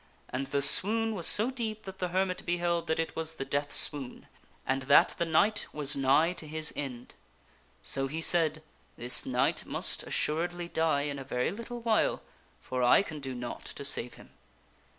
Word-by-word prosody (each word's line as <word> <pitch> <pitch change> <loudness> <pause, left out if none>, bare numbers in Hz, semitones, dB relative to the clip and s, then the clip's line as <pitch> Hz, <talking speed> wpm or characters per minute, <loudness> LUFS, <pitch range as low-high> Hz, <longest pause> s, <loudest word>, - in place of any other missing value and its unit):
And 135 +2 -4
the 140 0 -1
swoon 225 +8 +4
was 175 -6 +3
so 225 +5 +5
deep 220 -4 -5
that 190 0 -10
the 180 - -2
hermit 185 +1 -2
beheld 170 -1 -2
that 160 - -1
it 165 - -3
was 160 0 -1
the 135 - -6
death 145 +1 -2
swoon, 140 -4 +5 0.4
and 135 +1 -1
that - - +5
the 170 - 0
knight 205 +6 +1
was 150 -1 -2
nigh 140 +5 +2
to 155 - -5
his 155 0 -2
end.' 125 -4 -7 0.7
So 135 0 -1
he 155 +4 -6
said, 160 -2 +2 0.2
" - - -35
This 120 +1 +2
knight 125 +1 0
must - - -1
assuredly 175 +3 -3
die 160 -4 0
in 145 -1 -4
a - - -7
very 125 0 -2
little 235 +4 -8
while, 225 -2 0 0.4
for 130 0 -5
I 125 +10 +4
can 155 -6 -8
do 135 -2 -7
naught 120 0 -7
to 140 - -7
save 125 -3 -1
him." - - -17
155 Hz, 190 wpm, -29 LUFS, 135-180 Hz, 0.7 s, so